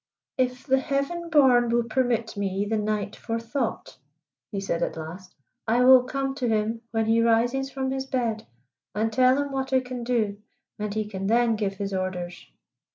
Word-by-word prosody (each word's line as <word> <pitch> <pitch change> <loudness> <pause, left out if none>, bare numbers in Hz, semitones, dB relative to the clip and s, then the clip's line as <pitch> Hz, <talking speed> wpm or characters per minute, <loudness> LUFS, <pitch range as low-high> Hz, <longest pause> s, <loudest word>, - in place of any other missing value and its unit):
"If 250 -1 -1
the 265 -2 +3
Heaven 300 +5 -2
born 260 -6 +5
will 235 0 +2
permit 235 -1 0
me 200 0 -1
the 220 +1 0
night 210 -1 -2
for 230 0 -3
thought," 230 +5 -4 0.5
he 200 - -2
said 185 -3 -2
at - - -2
last, 175 +4 -8 0.3
"I 235 +3 +3
will 260 0 +9
come 270 +1 -2
to 255 -3 -1
him 220 +1 0
when 225 -1 0
he 225 +1 +3
rises 240 +4 +2
from 265 -1 -3
his 265 0 -3
bed 230 -4 -2 0.5
and 220 +1 0
tell 255 +3 +4
him 285 0 -2
what 265 0 -3
I 260 - +5
can 250 -1 -6
do, 220 -4 0 0.4
and 210 0 -2
he 215 +1 -1
can 195 -2 -4
then 230 +1 +3
give 200 -2 -2
his 200 0 -4
orders." 180 -2 -4
230 Hz, 185 wpm, -25 LUFS, 210-260 Hz, 0.5 s, will